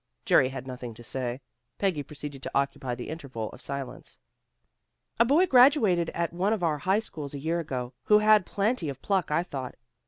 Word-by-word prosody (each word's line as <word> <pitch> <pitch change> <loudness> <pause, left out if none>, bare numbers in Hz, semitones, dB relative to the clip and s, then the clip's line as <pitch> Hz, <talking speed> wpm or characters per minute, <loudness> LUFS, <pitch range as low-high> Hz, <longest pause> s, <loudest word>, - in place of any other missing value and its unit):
Jerry 130 - +5
had 130 -1 -7
nothing 125 -3 -7
to 120 - -12
say. 125 +1 -4 0.4
Peggy 185 -7 0
proceeded 145 -1 -8
to - - -6
occupy 140 -2 -1
the 120 - -7
interval 135 -9 -5
of - - -12
silence. 135 -2 -6 1.0
"A 235 - +6
boy 300 +9 +4
graduated 245 - +5
at 170 0 -1
one 190 +5 +1
of 205 -5 -2
our 155 -3 +1
high 190 +7 +2
schools 150 -10 -5
a - - -5
year 165 +4 -1
ago, 130 -5 -4
who 210 - +6
had 215 -1 +5
plenty 200 - -1
of 135 -1 -8
pluck, 195 -3 +1
I 150 +3 +1
thought. 135 -7 -6
150 Hz, 190 wpm, -27 LUFS, 130-195 Hz, 1.0 s, A